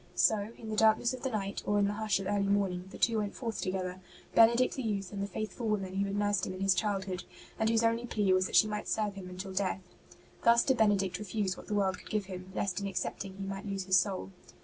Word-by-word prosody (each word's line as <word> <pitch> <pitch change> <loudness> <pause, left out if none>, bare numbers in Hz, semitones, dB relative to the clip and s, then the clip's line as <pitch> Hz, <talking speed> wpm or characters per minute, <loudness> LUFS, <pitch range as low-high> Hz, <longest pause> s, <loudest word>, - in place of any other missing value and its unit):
So, 215 0 +3
in 220 - -8
the 215 - -2
darkness 220 +3 +4
of 255 - -6
the 265 - -1
night, 200 -4 -3
or 205 - +1
in 205 - +4
the 200 - 0
hush 215 -2 0
of 195 - -5
early 200 0 +1
morning, 195 -3 +1
the - - -10
two 230 -2 +2
went 205 -1 -3
forth 230 -3 -4
together 185 -1 -3 0.2
— - - -24
Benedict 235 +2 +5
the 265 - -4
youth 205 -4 -2
and 200 - -3
the 200 - -1
faithful 215 +4 -4
woman 195 -3 -1
who 200 - +2
had 200 - -3
nursed 205 -2 +1
him 185 - -5
in - - -8
his 195 -1 +4
childhood, 190 -2 -1 0.4
and 220 - +2
whose 230 0 +3
only 230 +1 +1
plea 205 -4 +2
was 185 0 +3
that - - -4
she - - +7
might 210 -1 -4
serve 210 -2 0
him 190 -2 -8
until 185 +1 -7
death. 190 0 -1 0.6
Thus 235 0 +6
did 265 -2 +2
Benedict 195 -5 +2
refuse 205 -2 -2
what - - -12
the 210 - -1
world 190 -2 +1
could - - -13
give 210 -2 -1
him, 185 0 -8
lest 200 0 -1
in 200 - -2
accepting 195 0 -4
he 195 - -5
might 195 +1 -5
lose 195 -1 -2
his 185 0 +5
soul. 190 0 -2
200 Hz, 260 wpm, -31 LUFS, 190-215 Hz, 0.6 s, she